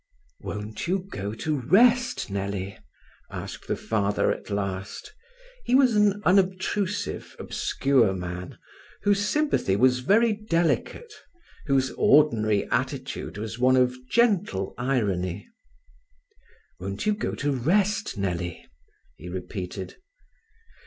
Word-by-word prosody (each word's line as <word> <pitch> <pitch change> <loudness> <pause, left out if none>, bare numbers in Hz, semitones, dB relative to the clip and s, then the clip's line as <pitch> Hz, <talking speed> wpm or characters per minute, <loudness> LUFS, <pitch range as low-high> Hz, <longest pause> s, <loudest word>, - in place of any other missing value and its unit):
"Won't 105 +8 -5
you 185 +3 +2
go 100 +2 -4
to 155 +6 -1
rest, 240 - +3
Nellie?" 100 -1 -3 0.5
asked - - -7
the - - 0
father 105 -2 0
at - - -6
last. 100 - -4 0.5
He 255 - +2
was 260 -4 +5
an 210 0 +3
unobtrusive, 190 +1 0
obscure 125 -8 +1
man, 90 0 -6 0.5
whose 205 0 +3
sympathy 285 - +1
was 125 +3 +4
very 215 - +3
delicate, 210 - -1 0.5
whose 135 -2 +2
ordinary 110 -9 +3
attitude - - -2
was 110 +2 -5
one 130 +1 +4
of 125 0 +3
gentle 195 - +1
irony. 100 -9 -1 1.3
"Won't 95 +2 -4
you 210 - +3
go 210 - -3
to 145 0 -1
rest, 190 - +1
Nellie?" 90 -3 -3 0.5
he 90 - -9
repeated. 95 +1 -6
125 Hz, 110 wpm, -26 LUFS, -, 1.3 s, was